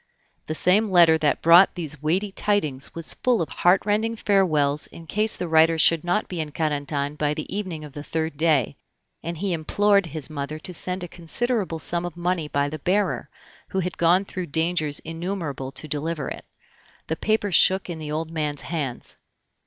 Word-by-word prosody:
The 155 - -3
same 200 +6 +3
letter 170 -3 +6
that 150 -2 0
brought 170 +3 +7
these 150 -5 -6
weighty 185 +7 0
tidings 155 -11 0
was 165 -1 +1
full 250 -3 +1
of 160 - -2
heartrending 210 +7 +2
farewells 155 -9 +2
in 165 - -13
case 210 +8 +1
the 180 - -4
writer 160 0 +4
should 160 0 +4
not 180 +5 0
be 180 - -5
in 150 -1 -5
Carentan 145 -2 -2
by 150 0 0
the 155 - -4
evening 185 -7 -4
of 150 -2 -10
the 145 - -7
third 160 -1 -3
day, 145 - +1 0.4
and 170 +1 -5
he 190 +2 -1
implored 200 +4 +2
his 155 -3 -4
mother 150 0 -5
to 180 +3 -4
send 180 +2 -1
a - - -5
considerable 180 +3 -2
sum 170 +3 +2
of 175 0 -6
money 175 -2 -1
by 140 -1 0
the 155 +2 -6
bearer, 195 +7 0 0.4
who 190 - -2
had 180 0 -4
gone 175 +3 +3
through 185 -2 -5
dangers 160 -1 0
innumerable 165 -5 -5
to 155 - -7
deliver 150 0 -2
it. - - -8 0.6
The 160 - -2
paper 215 +2 0
shook 190 +3 +4
in 170 -3 -6
the 150 -1 -6
old 160 +1 -3
man's 150 -3 -3
hands. 145 -7 -5
165 Hz, 185 wpm, -24 LUFS, 150-185 Hz, 0.6 s, brought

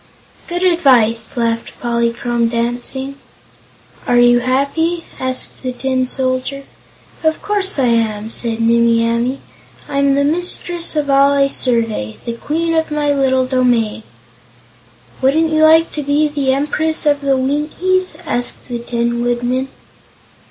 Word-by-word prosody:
"Good 350 +1 -3
advice!" 250 -11 +2
laughed 230 -1 -1
Polychrome, 235 0 0
dancing. 245 +4 -2 0.9
"Are 245 - +3
you 240 0 +5
happy?" 280 +7 0
asked 260 0 -2
the 255 - -3
Tin 260 0 -1
Soldier. 260 +1 -2 0.6
"Of 315 0 +1
course 405 -3 0
I 270 - +2
am," 220 -2 0
said 230 -1 -1
Nimmie 230 0 +3
Amee; 235 +3 -1 0.5
"I'm 280 -1 +1
the 280 - +2
mistress 345 +2 -1
of 290 -2 0
all 275 +1 +4
I 280 0 +3
survey 225 - -1
the 235 - -3
queen 330 +7 -2
of 320 0 0
my 295 -1 0
little 260 -2 +2
domain." 245 -4 +1 1.2
"Wouldn't 315 +5 +2
you 310 0 +2
like 320 +1 +5
to 300 - -3
be 290 +2 +1
the 285 -3 -1
Empress 305 +4 0
of 290 -1 +2
the 275 -1 +1
Winkies?" 305 +8 0
asked 245 -2 -3
the 240 -1 -3
Tin 235 0 -2
Woodman. 245 +2 -1
265 Hz, 135 wpm, -16 LUFS, 235-300 Hz, 1.2 s, you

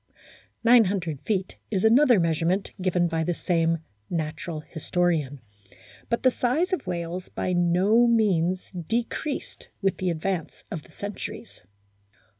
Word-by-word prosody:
Nine 235 -1 +7
hundred 170 -7 -2
feet 190 -4 -2
is 195 -4 0
another 245 0 +6
measure 165 -1 +1
ment 190 +3 0
given 180 -1 +2
by 165 -1 -1
the 175 +1 -1
same 165 -2 +1 0.3
natural 160 0 -3
historian. 160 -4 -1 0.7
But 235 - 0
the 255 - +5
size 305 +11 0
of 280 - -2
whales 175 +1 -4
by 185 - -2
no 185 +7 +4
means 185 -6 +2
decreased 230 - -3
with 195 -2 0
the 185 - -1
ad 160 -2 -3
vance 185 -4 -3
of 165 - -4
the - - -20
centuries. 205 0 -7
180 Hz, 140 wpm, -26 LUFS, 165-220 Hz, 0.7 s, Nine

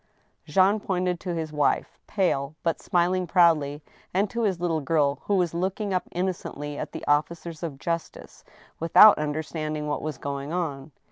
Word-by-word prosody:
Jean 190 +7 +3
pointed 180 -3 -1
to 180 -2 -4
his 160 -2 -4
wife, 150 -2 0
pale, 155 -7 0
but 165 -1 -1
smiling 180 +1 +1
proudly, 155 -5 +3 0.3
and 195 +2 +1
to 235 - -2
his 195 -6 0
little 165 -3 0
girl, 145 -1 +1
who 205 - +1
was 180 -3 +1
looking 190 +3 -2
up 185 - 0
innocently 175 -5 -3
at - - -5
the - - -7
officers 160 +2 -1
of 160 -5 -5
justice, 170 +3 -5 0.4
without 165 +5 +7
understanding 155 0 -3
what 145 - -2
was 155 -3 -4
going 140 +1 -5
on. 155 -5 -3
165 Hz, 160 wpm, -26 LUFS, 150-180 Hz, 0.4 s, without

